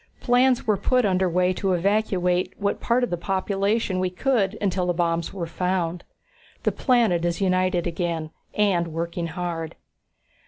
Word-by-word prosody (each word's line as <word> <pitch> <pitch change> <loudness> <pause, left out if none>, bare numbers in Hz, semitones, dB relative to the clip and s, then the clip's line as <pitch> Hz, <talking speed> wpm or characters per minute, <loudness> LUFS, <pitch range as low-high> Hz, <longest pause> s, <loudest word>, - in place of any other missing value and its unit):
Plans 250 0 +3
were 215 -3 +2
put 250 +4 +2
under 185 -1 +2
way 180 +1 +2
to 190 0 0
evacuate 180 -1 +1
what 200 -1 -1
part 245 +1 +2
of 245 - -1
the 175 - 0
population 195 +2 0
we 185 0 0
could 215 0 0
until 185 -3 0
the 175 - 0
bombs 170 -1 0
were 185 -4 -4
found. 175 0 -2 0.6
The - - +2
planet 230 -10 +2
is 175 -1 -1
united 185 -2 +1
again, 165 -2 -2 0.2
and 190 -5 +2
working 170 +1 -3
hard." 165 -2 -4
185 Hz, 155 wpm, -24 LUFS, 175-205 Hz, 0.6 s, Plans